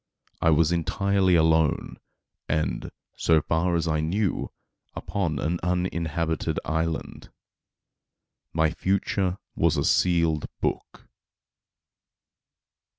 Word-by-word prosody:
I 80 - +4
was 80 +1 +4
entirely 95 +2 +2
alone, 80 -1 +2 0.5
and, 75 -6 -1 0.3
so 80 -1 +4
far 85 +3 0
as 85 0 0
I 80 -1 +1
knew, 95 +6 -1 0.4
upon 85 -7 -2
an 85 +5 -1
uninhabited 85 -2 -1
island. 80 0 -3 1.2
My 80 -1 +2
future 95 0 0 0.2
was - - +2
a - - +1
sealed 85 -4 +2
book. - - -4
85 Hz, 90 wpm, -25 LUFS, 80-90 Hz, 1.2 s, I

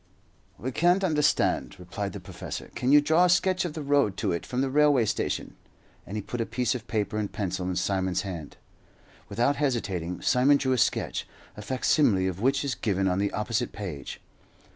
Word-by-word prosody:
"We 130 +6 -4
can't 175 +7 +3
understand," 150 - +1
replied - - -5
the - - -6
professor. - - -8
"Can 125 - 0
you 145 0 +8
draw 160 +4 +4
a - - +2
sketch 185 0 +2
of 170 - -4
the 155 -2 -5
road 140 -9 +2
to 105 -4 0
it 85 - -3
from 125 +1 -1
the 135 - 0
railway 145 -4 +4
station?" - - -2 0.5
and 105 - -5
he 105 - -4
put 120 +4 -4
a - - 0
piece 125 0 0
of 120 -3 -6
paper 105 -1 -1
and 105 -2 -3
pencil 95 -2 -3
in 90 - -2
Simon's 95 0 0
hand. 85 -7 -7 0.7
Without 120 +7 +1
hesitating, 100 - -2
Simon 135 +3 +4
drew 130 -2 -1
a - - +1
sketch, - - 0 0.3
a - - -8
facsimile 120 -4 +2
of 95 +1 -3
which 135 +3 +2
is 140 - -1
given 95 -4 0
on 90 0 +1
the 100 0 0
opposite 115 +3 -2
page. 90 -9 -6
115 Hz, 195 wpm, -27 LUFS, 95-140 Hz, 0.7 s, you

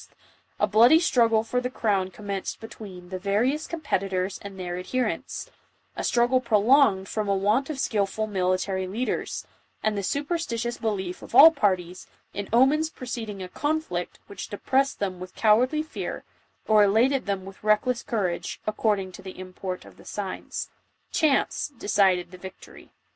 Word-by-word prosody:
a - - +4
bloody 225 +8 +6
struggle 230 -8 +3
for 250 +2 -1
the 250 - -2
crown 200 -7 0
commenced 200 0 -5
be 225 - -8
tween 185 -6 -11
the 185 0 -4
various 225 +10 0
competitors 195 - -2
and 200 -1 -9
their 175 -1 -4
adherents 250 +7 -3 0.2
— - - -41
a - - -4
struggle 245 +2 +3
prolonged 220 -3 +4
from 215 0 -2
a 200 - +3
want 210 +9 +1
of 305 - -4
skilful 215 -2 0
military 190 -1 -1
lead 225 +7 -2
ers, - - -3 0.4
and 215 -1 +1
the 200 - -1
superstitious 240 - -2
belief 190 -5 -3
of - - -8
all 325 - +11
parties, 185 - -1 0.3
in 200 0 -5
omens 275 +7 +4
preceding 225 -8 -6
a - - -6
conflict 290 - -2
which 200 -2 -8
depressed 265 +6 0
them 190 -3 -3
with 185 0 -9
coward 225 +4 +4
ly 305 0 0
fear, 315 - -6 0.4
or 215 -1 +6
elated 235 +6 +3
them 195 -2 -2
with 195 +1 -12
reckless 215 +3 +2
courage, 190 -7 -2
according 210 -3 0
to - - -11
the 190 -1 -9
import 185 0 -6
of - - -15
the - - -15
signs. 200 -2 -5 0.4
Chance 300 -1 +1
decided 190 -4 +2
the 185 - -11
victory. 190 +1 -12
210 Hz, 165 wpm, -26 LUFS, 190-250 Hz, 0.4 s, all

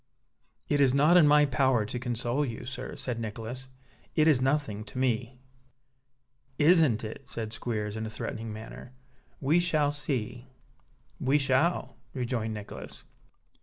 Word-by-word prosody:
"It 145 -1 +2
is 135 -1 +4
not 150 +5 +5
in 170 -4 +7
my 150 0 +6
power 130 -4 +2
to 120 +4 -4
console 120 +2 -1
you, 120 -2 -5
sir," 130 +1 -6
said 125 -2 -4
Nicholas. 115 +4 -6 0.5
"It 155 -1 +4
is 145 -5 +4
nothing 130 -6 0
to 125 - -10
me." 125 -1 0 1.2
"Isn't 155 -8 +4
it?" 110 0 -6
said 110 -1 -5
Squeers, 105 -2 -3
in 110 0 -3
a - - -5
threatening 110 0 -5
manner. 110 +3 -9 0.5
"We 150 +5 +3
shall 155 -4 +2
see!" 125 -4 -3 0.7
"We 135 +3 +3
shall," 140 +5 +1 0.2
rejoined 120 -3 -2
Nicholas. 105 -1 -8
125 Hz, 140 wpm, -29 LUFS, 115-145 Hz, 1.2 s, in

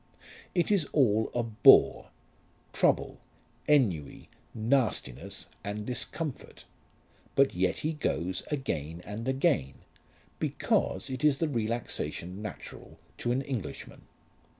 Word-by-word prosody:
It 175 +3 +2
is 195 -7 +3
all 110 -6 +3
a 120 - +1
bore, 110 -2 +6 0.6
trouble, - - +1 0.5
ennui, 100 - +1 0.2
nastiness, 110 - -1 0.2
and 105 +1 -4
discomfort. 140 +4 -5 0.7
But 135 0 +4
yet 90 0 +1
he 160 - +1
goes 90 - -2
again 85 - -3
and 110 +4 -6
again, 130 - +1 0.6
because 95 +8 0
it 130 +1 -5
is 150 -2 +4
the 165 - 0
relaxation 110 - -3
natural 105 -2 -9 0.2
to 120 - 0
an 130 +2 0
Englishman. 115 - -6
115 Hz, 105 wpm, -29 LUFS, 95-135 Hz, 0.7 s, bore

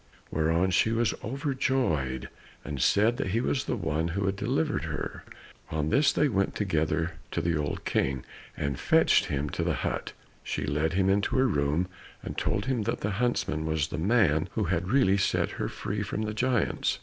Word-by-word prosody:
Hereupon 80 +4 +2
she 110 - +3
was 115 -2 +1
overjoyed, 130 - -1 0.4
and 70 -3 -4
said 110 +4 +3
that 140 - -1
he 105 +5 +1
was 130 +2 0
the - - -1
one 80 +3 -1
who 95 +3 -2
had 95 0 0
delivered 125 - 0
her. 80 -1 -5 0.5
On 75 -1 -1
this 140 +3 +4
they 150 - +2
went 100 -6 0
together 80 -4 0 0.2
to - - -2
the 85 0 0
old 75 -1 -3
King, 65 -2 0 0.3
and 70 -2 -2
fetched - - +4
him 70 +1 -2
to - - -2
the - - 0
hut, - - -3
and - - -30
she - - -3
led 75 +4 0
him 95 +1 +2
into 100 +1 +2
her 130 - +4
room, 75 - +1 0.4
and - - -5
told 100 - -1
him 130 -3 0
that 105 - -2
the 105 - -1
huntsman 120 -10 0
was 80 -1 0
the 75 - -4
man 90 -5 +3
who 110 - 0
had 90 -1 -1
really 110 -6 +4
set - - +1
her - - 0
free 105 +1 -4
from 100 +2 -2
the 105 0 -2
giants. 125 0 +1
95 Hz, 195 wpm, -28 LUFS, 80-115 Hz, 0.5 s, this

